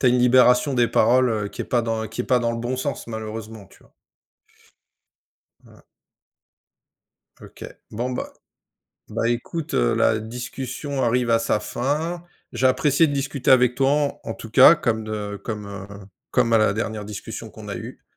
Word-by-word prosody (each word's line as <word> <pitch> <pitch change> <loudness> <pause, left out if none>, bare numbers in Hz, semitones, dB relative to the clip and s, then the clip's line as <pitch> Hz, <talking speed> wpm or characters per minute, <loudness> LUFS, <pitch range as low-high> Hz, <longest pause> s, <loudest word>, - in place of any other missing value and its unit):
tu 130 - +2
as - - +7
une 125 0 +3
libération 125 +2 +4
des 120 -2 +3
paroles, 125 +3 +3
heu, 105 -2 -2
qui - - -9
est - - -7
pas 120 -2 0
dans 110 -1 -2
qui 110 +3 -4
est - - -8
pas 125 - +3
dans 120 -1 -1
le 115 - -4
bon 120 +2 -3
sens 140 -1 -4
malheureusement, 110 -1 -7
tu - - -22
vois? - - -25 1.7
Voilà. - - -19 1.6
OK. - - -12 0.3
Bon 120 +4 -3
bah 125 - -5 0.8
bah 115 - -1
écoute, 145 +7 -3
heu, - - +2
la 110 - +2
discussion 130 +4 -5
arrive 120 +1 +1
à 115 - +4
sa 115 -2 0
fin. 155 +10 -2 0.3
J'ai 125 +2 +1
apprécié 140 +5 +3
de 145 - -3
discuter 140 -1 -1
avec 125 -2 +5
toi 135 +1 +2
en 145 -1 0
en - - -3
tout 115 - -10
cas 130 +7 +8
comme 110 -5 -1
de 105 -1 -4
comme, 105 -3 -5
heu, 100 -1 -8 0.4
comme 115 - +2
à 115 - +6
la 110 -2 +3
dernière 110 0 -3
discussion 105 -1 -7
qu'on - - -11
a - - -4
eu. - - -9
120 Hz, 185 wpm, -23 LUFS, 110-130 Hz, 1.7 s, cas